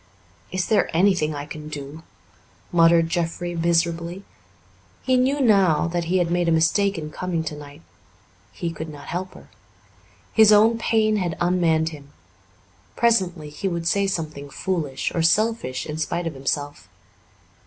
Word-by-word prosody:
"Is 185 -1 -1
there 215 - +2
anything 180 -5 +2
I 145 0 -5
can 150 0 -9
do?" 145 +1 -8 0.7
muttered 165 -1 +5
Jeffrey 175 +1 -2
miserably. 170 +2 0 0.8
He 260 - +2
knew 265 +3 +2
now 195 - +3
that 170 0 -2
he 180 +3 +1
had 175 -2 0
made 175 -1 +1
a - - +2
mistake 180 +5 +2
in 155 -1 -6
coming 175 -1 -3
tonight; 150 0 -8 0.7
he 170 - -4
could 160 0 -7
not 145 -2 -10
help 185 +2 -4
her. - - -14 0.9
His 220 -1 +6
own 220 +2 +5
pain 215 -1 +2
had 175 -4 -2
unmanned 170 -3 +2
him. 145 -3 -13 0.8
Presently 185 -10 +1
he 150 +6 -4
would 170 -2 -2
say 200 +2 +2
something 155 -6 -4
foolish 150 -5 -3
or 170 - 0
selfish 165 - +1
in 155 0 -5
spite 170 +2 -2
of 165 - -3
himself. 135 -7 -4
170 Hz, 150 wpm, -23 LUFS, 155-185 Hz, 0.9 s, His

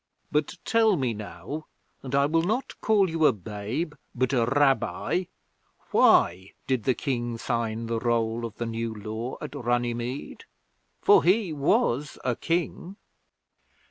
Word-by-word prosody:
'But 150 0 0
tell 225 -3 +4
me 130 -5 0
now, 140 +8 -7 0.3
and 135 0 -3
I 140 0 +4
will 165 +3 +2
not 220 +10 -1
call 210 -3 +4
you 160 -2 +3
a - - +5
babe 110 - -4 0.2
but 130 +2 0
a 120 -3 +2
Rabbi, 145 +6 +1 0.7
why 95 +3 +4
did 130 -4 -1
the 130 - +3
King 120 -4 -2
sign 115 -1 -2
the 115 0 -1
roll 115 0 0
of 115 -2 -5
the 120 - -2
New 115 0 -3
Law 110 +4 -5
at - - -6
Runnymede? 120 0 -2 0.6
For 415 0 +6
he 190 -2 +3
was 140 -1 +1
a 125 -2 +1
King.' 175 - -2
125 Hz, 140 wpm, -26 LUFS, 115-155 Hz, 0.7 s, For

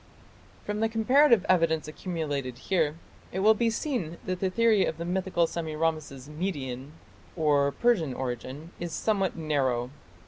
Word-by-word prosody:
From 210 0 -2
the 225 0 +2
comparative 235 0 +4
evidence 165 -4 +2
accumulated 150 -6 -4
here, 160 0 0 0.4
it 190 - -2
will 215 +2 +7
be 230 +1 +1
seen 225 - -2
that 185 -1 -2
the 190 - +1
theory 220 0 +3
of 160 - -2
the 170 - -4
mythical 180 -1 +1
Semiramis's 155 -4 -3
Median 145 -5 -4 0.4
or 145 -4 +3
Persian 165 - +1
origin 130 +5 -5
is 175 -2 -4
somewhat 195 +1 0
narrow. 135 -6 0
165 Hz, 140 wpm, -28 LUFS, 145-195 Hz, 0.4 s, will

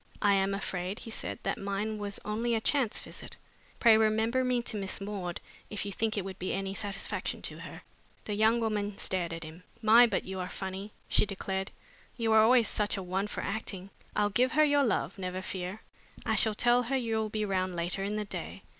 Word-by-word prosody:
"I 205 -1 +6
am 195 0 +2
afraid," 190 0 -3
he 225 - -8
said, - - -4
"that - - -1
mine 205 +2 -2
was 200 -1 -4
only 230 +3 0
a - - +2
chance 250 -1 +1
visit. - - -9 0.4
Pray 230 -2 +7
remember 220 +3 +3
me 250 -1 +1
to 220 - 0
Miss 195 -2 -2
Maud, 195 -4 -4 0.3
if 205 -1 -3
you 200 - -3
think 220 +2 -1
it 195 - -1
would 190 -1 -7
be 185 - -2
any 195 0 -2
satisfaction 200 0 -3
to - - -5
her." - - -9 0.4
The 210 - -2
young 220 +3 +4
woman 210 -3 -1
stared 175 -3 0
at 165 -1 -5
him. 160 +3 -10 0.2
"My, 230 +2 +7
but - - -1
you 190 0 -5
are 180 - -3
funny!" 190 +2 -5 0.2
she - - +3
declared. 190 -1 -3 0.5
"You 225 -2 +1
were 220 - +7
always 230 +1 +6
such 210 -1 0
a 195 - -3
one 190 +3 -1
for - - -4
acting! 200 -2 -4 0.2
I'll 205 0 +2
give 255 +5 +3
her 310 - +6
your 290 -1 +4
love, 225 -4 0
never 185 0 -3
fear. 185 +3 -5 0.4
I 220 - +2
shall 215 0 +3
tell 240 +2 +4
her 255 +3 0
you'll 220 -3 0
be 215 0 -1
round 185 -2 0
later 175 +3 -1
in 205 +2 -1
the 210 0 -2
day. - - -6
205 Hz, 215 wpm, -30 LUFS, 190-225 Hz, 0.5 s, Pray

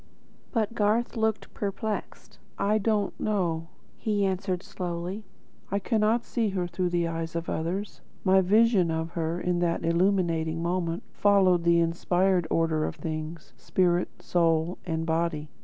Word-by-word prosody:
But 225 -2 0
Garth 220 +3 +1
looked 220 -1 -1
perplexed. 210 +1 -4 0.2
"I 210 +2 +2
do 215 - 0
not 205 -2 0
know," 170 -6 -1 0.3
he 205 -2 +1
answered 190 -1 -1
slowly. 180 +3 -5 0.4
"I 200 - 0
cannot 220 +2 +1
see 230 -3 0
her 190 -2 -1
through 175 +1 -1
the 175 -1 +1
eyes 165 0 -4
of 170 0 -3
others. 185 +6 -3 0.2
My 190 0 +5
vision 205 -1 +4
of 160 0 -2
her, 165 0 -2
in 180 -1 0
that 170 -1 0
illuminating 170 -2 +1
moment, 170 0 -1
followed 190 -4 +4
the 170 0 +5
inspired 175 +1 +1
order 160 -1 +1
of - - -4
things, 155 0 -6
spirit, 180 -1 +1
soul, 165 0 +1
and 165 -1 -1
body. 160 -2 -1
180 Hz, 145 wpm, -27 LUFS, 165-200 Hz, 0.4 s, My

